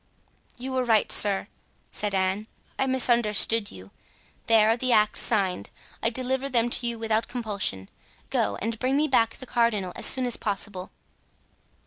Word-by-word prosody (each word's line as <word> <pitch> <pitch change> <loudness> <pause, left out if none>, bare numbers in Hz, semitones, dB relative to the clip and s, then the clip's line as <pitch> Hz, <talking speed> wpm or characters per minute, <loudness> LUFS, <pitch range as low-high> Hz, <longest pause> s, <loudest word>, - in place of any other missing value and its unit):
"You 260 +2 -6
were 260 -1 0
right, 225 -3 +2
sir," 200 -1 +4 0.4
said 205 -1 -3
Anne. 190 +3 -1 0.3
"I 270 - +1
misunderstood 230 -4 +2
you. 95 +1 -13 0.6
There 220 -2 +5
are - - +2
the 255 +1 -1
acts 215 -2 +3
signed; 195 -5 0 0.3
I 230 - +1
deliver 260 +3 -2
them 240 -2 +1
to 240 - +1
you 235 -1 -3
without 225 0 -1
compulsion. 200 - -3 0.4
Go 100 - 0
and 225 0 -3
bring 260 +2 0
me 305 +1 +2
back 230 -5 +2
the 260 - -10
cardinal 220 -7 0
as - - +1
soon 260 -1 +2
as 245 - -1
possible." 200 -2 -4
225 Hz, 160 wpm, -25 LUFS, 205-250 Hz, 0.6 s, There